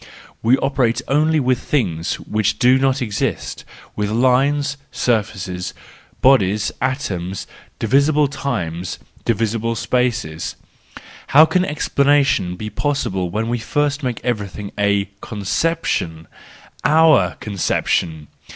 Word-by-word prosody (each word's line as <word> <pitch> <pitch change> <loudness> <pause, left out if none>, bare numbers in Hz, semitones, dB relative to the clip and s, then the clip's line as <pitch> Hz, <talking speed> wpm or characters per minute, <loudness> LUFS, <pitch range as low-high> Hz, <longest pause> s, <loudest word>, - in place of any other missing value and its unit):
We 120 +4 +4
operate 135 -4 0
only 155 +3 +3
with 130 -2 +1
things 90 - -1
which 105 -1 0
do 130 +1 +4
not 135 0 +1
exist, 105 -4 -3 0.3
with 105 -1 -1
lines, 135 +5 +2 0.2
surfaces, 95 -6 -2 0.5
bodies, 105 -6 +3
atoms, 100 -9 -2 0.3
divisible 140 +5 +3
times, 90 - -3 0.3
divisible 115 0 0
spaces—how 120 - 0
can 180 +3 +1
explanation 145 - +2
ever 90 - -5
be 110 +2 -6
possible 105 -8 -1
when 110 +5 -2
we 120 +1 -1
first 145 +5 -1
make 125 -4 -2
everything 105 -4 -3
a 100 -1 +2 0.2
conception, 100 - -2 0.6
our 160 +1 +4
conception! 85 -5 -1
115 Hz, 105 wpm, -19 LUFS, 100-140 Hz, 0.6 s, We